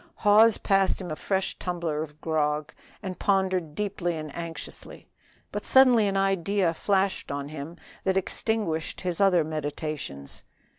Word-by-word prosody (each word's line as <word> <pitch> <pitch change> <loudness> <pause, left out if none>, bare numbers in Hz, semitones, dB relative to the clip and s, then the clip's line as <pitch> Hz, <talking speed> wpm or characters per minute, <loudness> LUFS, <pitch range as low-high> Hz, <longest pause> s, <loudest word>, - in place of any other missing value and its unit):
Hawes 215 +2 +5
passed 195 -1 +2
him 180 -4 -6
a - - -2
fresh 190 +3 -2
tumbler 170 -4 -2
of 150 -1 -7
grog, 150 -2 0 0.3
and 185 -2 -5
pondered 185 -6 +1
deeply 185 -4 -2
and 155 -2 -7
anxiously. 170 -1 -7 0.4
But - - -4
suddenly 250 -5 +6
an 195 0 0
idea 195 -2 +1
flashed 195 +1 0
on 140 0 -4
him 155 +3 -7 0.3
that 190 0 +1
extinguished 190 -4 -1
his 180 0 -2
other 185 -4 +5
meditations. 150 - -5
175 Hz, 140 wpm, -27 LUFS, 155-195 Hz, 0.4 s, suddenly